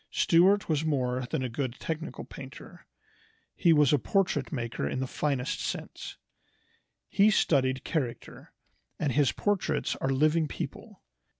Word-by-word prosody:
Stuart 190 Hz, +5 st, +4 dB
was 155 Hz, -2 st, +1 dB
more 130 Hz, -5 st, -1 dB
than 130 Hz, -, -2 dB
a -, -, -1 dB
good 125 Hz, +1 st, -3 dB
technical 160 Hz, 0 st, -5 dB
painter. 135 Hz, -1 st, -11 dB, 0.7 s
He 170 Hz, -, +3 dB
was 150 Hz, -3 st, +5 dB
a 145 Hz, -, +4 dB
portrait 195 Hz, +7 st, 0 dB
maker 120 Hz, -5 st, -3 dB
in -, -, -3 dB
the 130 Hz, -, -1 dB
finest 135 Hz, -1 st, -2 dB
sense. -, -, -5 dB, 0.9 s
He 200 Hz, +2 st, +4 dB
studied 130 Hz, -10 st, +2 dB
character, 130 Hz, -8 st, -4 dB, 0.5 s
and 150 Hz, -, 0 dB
his 140 Hz, +1 st, +3 dB
portraits 200 Hz, -7 st, -1 dB
are 135 Hz, -, -2 dB
living 155 Hz, +4 st, +2 dB
people. -, -, -7 dB
145 Hz, 135 wpm, -29 LUFS, 130-165 Hz, 0.9 s, was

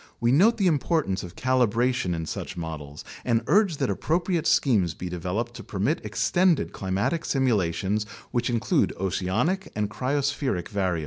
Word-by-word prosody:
We 120 Hz, +1 st, +2 dB
note 200 Hz, -, +5 dB
the 200 Hz, -, +1 dB
importance 155 Hz, -, +1 dB
of 90 Hz, +1 st, -9 dB
calibration 125 Hz, -5 st, +1 dB
in 80 Hz, -1 st, -3 dB
such -, -, -5 dB
models 75 Hz, -4 st, -6 dB, 0.2 s
and 115 Hz, -2 st, +1 dB
urge 200 Hz, -, +3 dB
that 135 Hz, -2 st, 0 dB
ap -, -, -4 dB
propriate 170 Hz, +1 st, 0 dB
schemes 95 Hz, -, +3 dB
be 90 Hz, -, -5 dB
developed 90 Hz, +7 st, -3 dB
to -, -, -8 dB
permit 110 Hz, -, -1 dB
extended 175 Hz, -3 st, +1 dB
climatic 100 Hz, -, -1 dB
simula 115 Hz, -, +1 dB
tions 105 Hz, +5 st, -1 dB, 0.3 s
which 120 Hz, 0 st, 0 dB
include 115 Hz, -3 st, +1 dB
oceanic 95 Hz, -, -1 dB
and 105 Hz, -1 st, -1 dB
cryospheric 135 Hz, -, -1 dB
variables. 95 Hz, -5 st, 0 dB
115 Hz, 155 wpm, -26 LUFS, 95-145 Hz, 0.3 s, note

